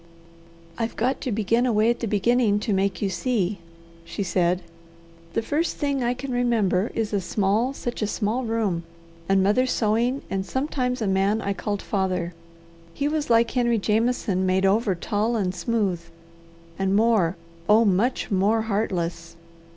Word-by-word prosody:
"I've 225 0 -2
got 255 +4 0
to 255 - -2
begin 225 +4 +1
away 220 0 +3
at 240 - -3
the 230 - -2
beginning 215 +1 +2
to 215 - -1
make 195 +1 0
you 200 - +1
see," 205 -4 -1 0.4
she 200 - -4
said. 180 -1 +1 0.7
"The 225 - 0
first 310 +8 -1
thing 280 -3 -1
I 240 +1 0
can 265 +1 -6
remember 230 -5 +1
is 220 -2 -2
a 200 - +1
small, 205 +6 +1
such 240 -4 -5
a 210 - +1
small 220 +4 -1
room, 220 -7 -1 0.5
and 195 -1 +4
mother 210 +7 +3
sewing 235 +3 +1
and 195 0 -2
sometimes 255 0 -2
a - - 0
man 195 +3 +2
I 200 -2 -1
called 205 0 -3
father. 185 -3 -1 0.6
He 285 - 0
was 300 -2 -1
like 230 0 +4
Henry 240 -2 +2
Jameson 215 -2 0
made 185 +1 +2
over 200 0 +2
tall 215 +6 -1
and 190 -5 0
smooth, 195 -3 -1 0.8
and 195 0 +1
more, 210 -6 +3 0.3
oh, 220 +2 +6
much 215 +6 +1
more 205 +4 +2
heartless! 175 -6 -2
215 Hz, 160 wpm, -24 LUFS, 195-240 Hz, 0.8 s, oh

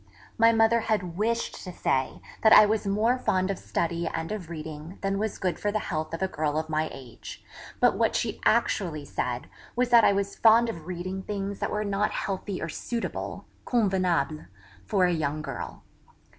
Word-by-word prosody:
My 230 0 +6
mother 225 +1 +4
had 205 -6 -1
wished 230 +4 -1
to 185 - -6
say 130 - -1 0.2
that 220 - +5
I - - +10
was 215 0 0
more 220 +6 +2
fond 185 -4 +1
of 195 - -4
study 170 0 -2
and 165 +3 -3
of 195 -6 -5
reading 160 +2 -7
than 195 0 0
was 215 0 -2
good 180 -4 -2
for 205 - 0
the 215 - 0
health 155 -6 -3
of 165 - -3
a - - +2
girl 155 -4 -1
of 160 0 -2
my 155 0 0
age; 130 -4 -10 0.4
but - - +4
what - - +1
she - - -2
actually 155 -6 +1
said 125 -3 -3 0.3
was 245 0 +1
that 235 -2 +7
I - - +6
was 200 0 -1
fond 230 +1 +5
of 165 -7 -7
reading 185 +1 -4
things 200 0 -4
that - - -1
were 210 0 -1
not 200 +1 +1
healthy 195 0 -3
or - - -3
suitable 230 +8 -4 0.2
(convenable) 185 - +1 0.4
for 185 - +3
a 180 - +2
young 155 -1 -1
girl. 135 -4 -6
190 Hz, 190 wpm, -27 LUFS, 160-215 Hz, 0.4 s, I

